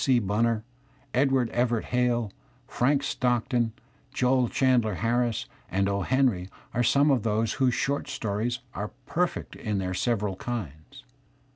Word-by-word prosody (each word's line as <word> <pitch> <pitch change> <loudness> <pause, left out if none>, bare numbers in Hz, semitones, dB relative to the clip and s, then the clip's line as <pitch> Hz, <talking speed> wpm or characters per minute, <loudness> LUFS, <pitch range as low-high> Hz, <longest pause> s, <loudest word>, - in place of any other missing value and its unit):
C. 130 -2 +4
Bunner, 110 +1 +1 0.5
Edward 130 -2 +2
Everett 120 -2 +1
Hale, 120 -3 +1 0.4
Frank 140 +3 +1
Stock 125 -4 0
ton, 120 -2 +1 0.4
Joel 125 -2 +2
Chandler 125 -6 +2
Harris, 120 +2 0 0.2
and 95 +1 +1
"O. 100 0 0
Heniy 120 -6 +1
" - - -29
are 120 - +1
some 140 +4 +4
of 130 -4 +3
those 110 +1 0
I - - -9
whose 130 -3 +2
short 140 +1 -1
stories 120 -3 -2
are 105 +1 -5
perfect 180 +1 -1
in 105 -3 -2
their 90 -1 -2
several 105 -2 0
kinds. 115 - -6
120 Hz, 150 wpm, -27 LUFS, 105-130 Hz, 0.5 s, C